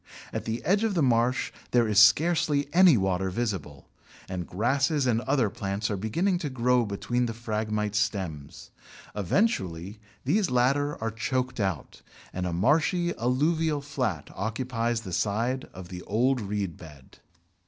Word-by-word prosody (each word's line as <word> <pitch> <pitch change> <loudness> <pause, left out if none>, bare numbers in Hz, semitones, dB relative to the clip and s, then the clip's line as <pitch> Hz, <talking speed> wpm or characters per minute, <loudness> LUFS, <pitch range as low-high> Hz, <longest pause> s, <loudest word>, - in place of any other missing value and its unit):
At - - -3
the 115 +1 -4
edge 200 +3 +2
of 220 -3 0
the 165 - +2
marsh 125 0 +2 0.2
there 120 -2 +3
is 105 -1 +4
scarcely 145 +5 +4
any 175 -6 +7
water 95 -1 0
visible, 90 - -4 0.4
and 90 -2 -5
grasses 135 - +1
and 115 -2 +2
other 130 -3 +1
plants 100 -1 -3
are - - 0
beginning 170 - 0
to 150 - -3
grow 125 -2 +2
between 120 +5 -1
the 115 - -5
Phragmites 105 -2 -2
stems. 95 -9 -4 0.4
Eventually 100 - -1 0.3
these 185 +7 +2
latter 135 +4 +1
are 115 - -1
choked 125 +3 -2
out, 95 -6 -3 0.3
and 90 0 -2
a - - -2
marshy 160 - +2
alluvial 150 +6 +1
flat 125 - -3
occupies 115 +2 -2
the 95 -5 -7
site 115 +8 0
of 90 -1 -11
the 90 -1 -7
old 125 +4 +1
reed 100 -4 -3
bed. 75 -6 -14
115 Hz, 150 wpm, -27 LUFS, 100-135 Hz, 0.4 s, any